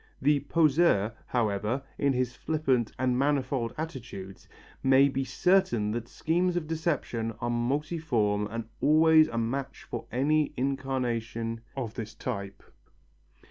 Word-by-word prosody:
The 145 +2 +3
poseur, 145 - +3
however, 110 +2 0 0.2
in 140 -1 +2
his 125 -1 -1
flippant 135 -7 0
and 125 -1 +1
manifold 135 -4 0
attitudes, 120 - -7 0.3
may 135 +1 +5
be 135 0 -1
certain 135 - +2
that 120 +1 -3
schemes 175 +6 0
of 175 -3 -1
deception 150 -8 -2
are 120 0 -1
multiform 120 -5 0
and 115 0 -4 0.2
always 155 +1 +6
a 120 - -5
match 125 +4 -3
for - - -6
any 150 +4 +1
incarnation 120 -4 -2 0.2
of 120 -5 -3
this 110 -2 -6
type. 100 -5 -5
130 Hz, 125 wpm, -28 LUFS, 115-150 Hz, 0.3 s, always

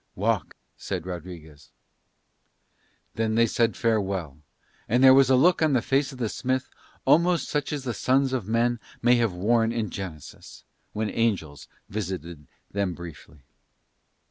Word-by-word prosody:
"Walk," 105 -2 -1 0.2
said 90 -4 -5
Rodriguez. 80 -5 -9 1.4
Then 110 -1 -1
they 115 +1 +5
said 115 0 0
farewell, 95 -10 -1 0.5
and 125 +3 +3
there 130 0 +9
was 135 -1 +5
a 130 - +5
look 170 +8 +4
on 155 -3 +3
the 125 - +3
face 135 +1 +1
of 130 - -11
the 120 -3 -1
smith 130 +3 -2 0.3
almost 170 +5 +3
such 145 -2 -2
as 145 -3 -3
the 125 -3 -3
sons 130 +4 +1
of 120 -7 -2
men 120 +1 +1 0.2
might 120 0 +5
have 115 -5 +1
worn 115 +4 +2
in 115 -2 -3
Genesis 90 -7 -9 0.3
when 110 0 -2
angels 90 - -1 0.2
visited 85 -7 -6 0.2
them 100 -3 -1
briefly. 75 -4 -11
110 Hz, 145 wpm, -25 LUFS, 90-130 Hz, 1.4 s, there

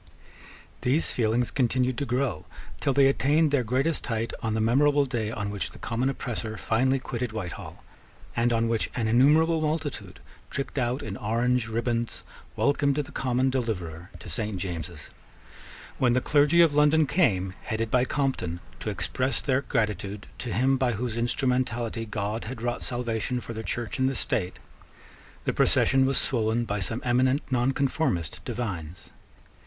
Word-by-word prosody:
These 140 +6 +2
feelings 120 +1 +1
continued 125 0 +1
to 140 - -2
grow 125 - -1 0.3
till 140 - +1
they 135 +1 +5
attained 145 +3 +3
their 140 -3 +2
greatest 130 +7 0
height 115 0 -2
on 110 -2 -1
the - - 0
memorable 140 +6 +4
day 115 -5 -2
on 105 -2 -3
which 100 -2 -3
the - - -13
common 120 +3 -1
oppressor 115 -4 -4
finally 130 +7 +2
quitted 125 -2 -4
Whitehall, 95 -6 -6 0.5
and 120 +1 +2
on 115 0 +2
which 115 -1 0
an 115 -3 0
innumerable 155 +8 +4
multitude, 150 - -3 0.3
tricked 140 0 -3
out 125 +2 -1
in 100 -2 -5
orange 120 +2 +1
ribands, 115 +1 -2 0.3
welcomed 140 0 +2
the 150 -2 -3
common 130 0 +1
deliverer 90 -9 -3
to - - -12
Saint 105 -4 -2
James's. 85 -4 -6 0.9
When 125 -2 +4
the 125 - +3
clergy 150 +5 +4
of 165 -3 +5
London 150 +1 +5
came, 95 - +1
headed 110 -1 -2
by 125 -1 +4
Compton, 130 - -1 0.2
to - - -3
express 130 +1 -1
their 135 -1 +1
gratitude 105 -4 -2
to 120 - -4
him 130 +7 +2
by 125 -2 +1
whose 115 +1 -3
instrumentality 120 -2 -1
God 105 +2 -3
had 115 0 -6
wrought 120 0 -1
salvation 120 0 -2
for 115 - -7
the 110 - -5
Church 115 +1 -3
and 130 0 +3
the 135 - -3
State, 90 -6 -2 0.9
the - - 0
procession 135 0 +4
was 135 - +2
swollen 115 -1 +1
by 105 -1 -2
some 110 +5 -3
eminent 130 +3 +2
nonconformist 130 - 0
divines. 95 -9 -5
120 Hz, 160 wpm, -27 LUFS, 110-135 Hz, 0.9 s, they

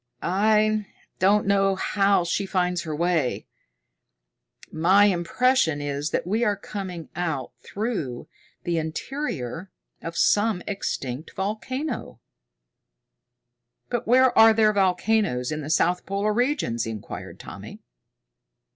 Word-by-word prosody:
I 215 +2 +2 0.3
don't 205 +2 +3
know 195 -1 +3
how 195 -1 +2
she 185 +3 -1
finds 180 -2 0
her 155 -2 -4
way. 165 -5 0 1.3
My 185 +6 +4
impression 185 - +2
is 145 +1 -3
that - - -1
we 215 +6 0
are 210 -3 +2
coming 190 -4 -7
out 160 -6 -3
through 195 - -4 0.4
the 170 -2 0
interior 165 - -4 0.3
of 165 +1 -6 0.2
an 205 -3 0
extinct 145 -8 -4
volcano." 225 +9 -4 1.7
"But 240 -1 -2
where 255 +1 +5
are 225 0 +8
there 215 -1 +3
volcanoes 190 - +1
in 155 0 -3
the 145 - -6
south 175 +3 +1
polar 200 +2 0
regions?" 240 - 0
inquired 110 -2 -7
Tommy. - - -10
190 Hz, 110 wpm, -24 LUFS, 160-215 Hz, 1.7 s, are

